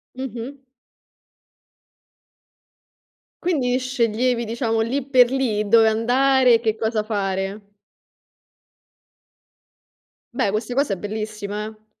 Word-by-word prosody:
Mh-mh. 260 +1 -6 2.8
Quindi 260 -8 +1
sceglievi 245 -1 0
diciamo 225 0 -1
lì 260 +5 -1
per 250 -2 +5
lì 225 -6 0
dove 225 +1 +5
andare 250 +3 +3
e - - +2
che 220 -2 0
cosa 220 -1 -1
fare. 200 -1 -3 2.6
Beh, 195 - 0
questa 220 +3 -3
cosa 275 -7 +1
è - - -4
bellissima, 210 0 -5
eh. 215 0 -12
225 Hz, 95 wpm, -22 LUFS, 215-255 Hz, 2.8 s, per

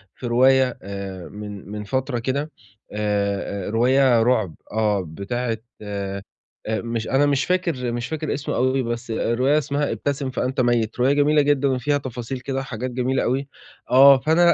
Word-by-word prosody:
في 125 - -6
رواية 130 +2 +4
آآ 100 -2 -7
من 105 -1 -8
من 105 0 -5
فترة 130 +3 -2
كده، 140 +6 -2 0.4
آآ 100 -2 -1
رواية 125 +1 +4
رعب، 110 -9 +1 0.2
آه، 105 -2 +1
بتاعة 115 +7 -3 0.2
آآ 100 -1 -4 0.5
مش 115 +1 -2
أنا 140 +2 +3
مش 140 -2 +1
فاكر 170 -10 0
مش 120 +1 -3
فاكر 155 -1 -3
اسمه 145 - -3
أوي 130 +1 +1
بس 120 0 -4
الرواية 130 +6 +1
اسمها 145 0 -1
ابتسم 140 -1 -2
فأنت 130 +1 -1
ميّت، 120 -2 +1
رواية 130 +3 +4
جميلة 145 +1 +4
جدًا 145 -1 +2
وفيها 135 +2 +1
تفاصيل 130 -1 -5
كده 135 +1 -3
وحاجات 130 -1 -5
جميلة 130 +2 0
أوي. 135 +3 -1 0.4
آه، 135 +2 +8
فأنا 170 +4 +4
125 Hz, 155 wpm, -22 LUFS, 110-135 Hz, 0.5 s, آه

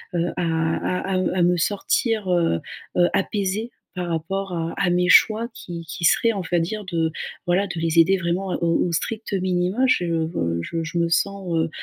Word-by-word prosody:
heu, 170 0 0
à 165 +3 -1
à - - +1
à - - +1 0.2
à - - +3
me 175 +1 +4
sortir, 210 +3 0
heu, 165 - +2 0.4
heu, 175 -1 +5
apaisée 205 +3 -1 0.3
par 180 -1 -3
rapport 185 +4 -3
à 165 -1 -2
à 180 - +2
mes 180 0 +2
choix 220 +4 +5
qui 170 -1 -7
qui 170 +1 -4
seraient, 230 +7 +4
on 200 - -3
va 175 - +3
dire, 205 +5 -3
de, 165 -3 0 0.4
voilà, 180 +3 +2
de 170 - -5
les 165 0 +2
aider 190 +4 +5
vraiment, 180 +1 -2
heu, - - -1
au 170 +1 +2
au - - -3
strict 215 +6 -3
minima. 185 +5 +1
Je, 180 -8 +2
heu, 160 - -1
je 165 - -3
je 165 +2 -4
me 170 - +1
sens, 195 +1 0
heu 160 0 +1
175 Hz, 205 wpm, -23 LUFS, 165-195 Hz, 0.4 s, heu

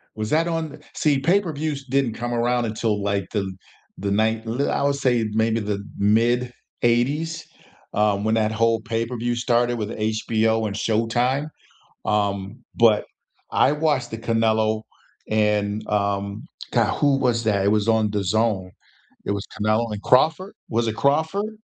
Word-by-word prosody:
Was 110 0 -3
that 160 +2 +3
on 160 -3 -3 0.2
see, 145 -3 +2
pay-per-views 155 -4 0
didn't 135 -3 0
come 120 +1 -4
around 120 +1 +1
until, 110 -1 -1
like, 100 -1 -1
the 100 -3 -2 0.5
the 100 +1 -2
ninet 110 +2 +1
li 120 +5 -1
I - - 0
would 140 0 +2
say 125 -4 +1
maybe 110 +1 +1
the 100 -2 -3
mid 120 +4 +2 0.3
'80s? 140 +8 +1 0.5
Um, 105 -1 +2
when 110 +1 +2
that 110 -1 +1
whole 115 0 +2
pay-per-view 115 +1 -2
started 120 0 +1
with 105 -2 -3
HBO 110 0 0
and 100 - -5
Showtime. 120 +7 0 0.6
Um, 100 +3 -1
but 115 -3 +4 0.5
I 135 - +4
watched 150 -5 0
the 115 - -5
Canelo 110 -1 +1 0.5
and, 105 -1 +1
um, 100 0 -1 0.3
god, - - +2
who 140 -2 +3
was 120 -3 +1
that? 100 -3 +1
It - - +3
was 105 +1 +2
on 110 -2 +3
DAZN. 100 -1 0 0.6
It - - 0
was 100 -1 -4
Canelo 110 +2 +1
and 105 -1 -5
Crawford? 160 +9 +3
Was 115 0 0
it 110 - -3
Crawford? 160 - 0
115 Hz, 150 wpm, -23 LUFS, 105-125 Hz, 0.6 s, but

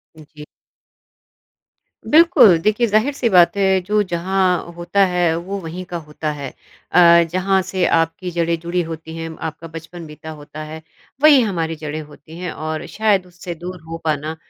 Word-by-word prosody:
जी। 150 -1 -13 1.7
बिल्कुल। 310 - +7
देखिए 215 +3 +2
ज़ाहिर-सी 235 +4 +1
बात 180 0 +5
है, 190 -1 +3
जो 210 +3 +1
जहाँ 180 +1 0
होता 175 +3 +1
है, 175 -2 +1
वो 190 +4 -5
वहीं 175 +2 -7
का 175 -1 -5
होता 150 0 -3
है। 140 -3 -6 0.4
अ, 170 -1 +6
जहाँ 190 +1 +1
से 185 -2 0
आपकी 175 +2 -2
जड़ें 170 0 0
जुड़ी 170 +1 -2
होती 160 0 -8
हैं, 165 0 -5
आपका 160 +1 -6
बचपन 165 +1 -10
बीता 155 +1 -11
होता 155 +1 -9
है, 155 +1 -9 0.4
वही 300 -3 +7
हमारी 165 -7 -2
जड़ें 155 0 -6
होती 150 +2 -14
हैं 180 -2 -4
और 155 0 -5
शायद 205 -4 +2
उससे 175 -1 -8
दूर 180 +2 -8
हो 165 - -5
पाना 155 0 -2
170 Hz, 160 wpm, -19 LUFS, 160-190 Hz, 1.7 s, बिल्कुल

